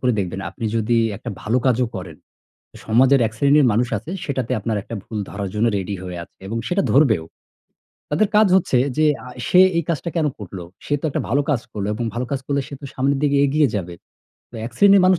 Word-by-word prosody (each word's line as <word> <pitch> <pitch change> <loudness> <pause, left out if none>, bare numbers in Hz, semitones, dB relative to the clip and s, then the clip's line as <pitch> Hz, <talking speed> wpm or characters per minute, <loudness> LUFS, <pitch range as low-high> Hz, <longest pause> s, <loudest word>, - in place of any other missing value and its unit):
করে 125 -1 +2
দেখবেন, 95 0 -2
আপনি 115 - -8
যদি 115 +1 +1 0.2
একটা - - -7
ভালো 115 +4 +1
কাজও 125 0 +3
করেন, 90 -4 -7 0.7
সমাজের 130 +4 +4
এক 110 - -5
শ্রেণীর 140 +1 +4
মানুষ 120 +3 +1
আছে 135 - -10
সেটাতে 130 -3 -2
আপনার 110 +1 -2
একটা 115 - -7
ভুল 110 -2 -6
ধরার 100 -1 -4
জন্য 110 +2 +2
রেডি 100 +1 -3
হয়ে 90 -1 -6
আছে - - -31
এবং 115 +3 -3
সেটা 190 +2 +1
ধরবেও। 120 - +4 0.9
তাদের 195 +8 +2
কাজ 215 0 +6
হচ্ছে 135 -8 +2 0.2
যে 155 0 +4 0.2
আ - - -8 0.2
সে 180 - +6 0.2
এই 170 - +2
কাজটা 170 +1 -2
কেন 160 - +2
করল? 100 -2 -8 0.3
সে 145 - -1
তো - - -13
একটা - - -1
ভালো 145 +1 +2
কাজ 130 -6 +1
করল 100 -2 -3
এবং 120 +2 -3
ভালো 125 +2 -1
কাজ 135 -2 -1
করলে 140 -1 0
সে 140 - -7
তো - - -10
সামনের 135 +1 +1
দিকে 145 -1 +2
এগিয়ে 145 0 +3
যাবে। 90 -3 -3 0.6
তো 120 - -11
এক 120 - -6
শ্রেণীর 200 -1 +6
মানুষ 185 -1 +5
125 Hz, 215 wpm, -21 LUFS, 110-145 Hz, 0.9 s, কাজ